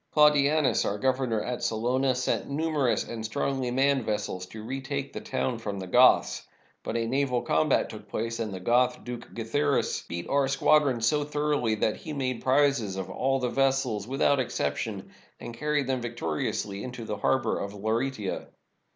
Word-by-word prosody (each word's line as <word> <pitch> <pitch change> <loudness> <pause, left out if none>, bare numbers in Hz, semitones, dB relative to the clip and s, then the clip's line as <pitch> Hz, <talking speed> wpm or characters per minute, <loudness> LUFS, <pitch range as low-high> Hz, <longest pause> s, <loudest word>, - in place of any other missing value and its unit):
Claudianus, 150 -1 +4
our 100 - -1
governor 130 -2 0
at 125 0 -4
Salona, 125 +4 +1
sent 125 +2 -1
numerous 145 -3 +1
and 115 -2 -6
strongly 130 +3 -1
manned 135 +1 +2
vessels 95 -4 -3
to 110 +3 -9
retake 135 +3 -4
the - - -5
town 125 -3 -2
from 105 -3 -4
the 95 - -5
Goths. 90 - +4 0.4
But 115 - -3
a 115 - 0
naval 125 0 0
combat 80 0 +2
took - - -11
place, 115 +1 -3
and 110 -2 -2
the 95 - -5
Goth, 120 +6 +2
Duke 120 -1 -7
Guiitharis, 140 +5 0
beat 85 0 -5
our 140 -1 +2
squadron 140 -2 +3
so 145 +6 +2
thoroughly 145 -6 0
that 105 0 0
he - - -10
m.ade 130 -5 -2
prizes 130 -7 +2
of 95 -1 -5
all 135 +1 +1
the 125 -1 -1
vessels 130 -6 +1
without 135 +1 +2
exception, 130 - -2 0.3
and 120 - -7
carried 150 +3 0
them 130 -1 -1
victoriously 100 -2 -3
into 125 -2 -6
the 105 -1 -3
harbor 135 +5 +1
of 100 +1 -5
Laureata. 110 0 -2
125 Hz, 170 wpm, -27 LUFS, 110-140 Hz, 0.4 s, Claudianus